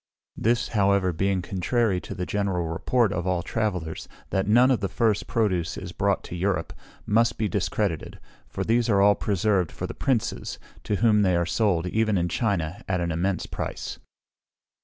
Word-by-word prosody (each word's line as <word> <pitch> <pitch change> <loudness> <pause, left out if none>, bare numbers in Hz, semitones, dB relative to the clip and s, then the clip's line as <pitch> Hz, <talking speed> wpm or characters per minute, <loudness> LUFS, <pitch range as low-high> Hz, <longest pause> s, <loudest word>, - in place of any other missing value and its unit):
This, 115 +1 +1
however, 100 -3 +2
being 95 +2 0
contrary 95 +1 0
to - - -7
the 90 - -3
general 95 -4 -1
report 110 +6 +1
of 90 -3 -2
all 90 -1 0
travellers, 90 -8 -3 0.2
that 95 0 0
none 120 +5 +5
of 125 - +2
the 100 -1 -2
first 110 -3 +1
produce 95 -7 0
is - - -6
brought - - 0
to - - -7
Europe, 90 -2 -1 0.3
must 115 +2 +2
be 110 - 0
discredited; 100 -4 -2 0.3
for - - -4
these 115 +1 +1
are 100 -3 +4
all 100 +1 +6
preserved 100 -4 0
for - - -5
the - - -5
Princes, 115 -4 -1 0.3
to 105 - 0
whom 105 0 +4
they 95 -3 +3
are 85 0 +1
sold, 90 -3 +1
even 110 +2 +1
in 85 0 0
China, 95 -6 -1
at 95 -1 0
an 85 -1 -1
immense 90 +4 -1
price. - - -5
100 Hz, 180 wpm, -25 LUFS, 90-110 Hz, 0.3 s, all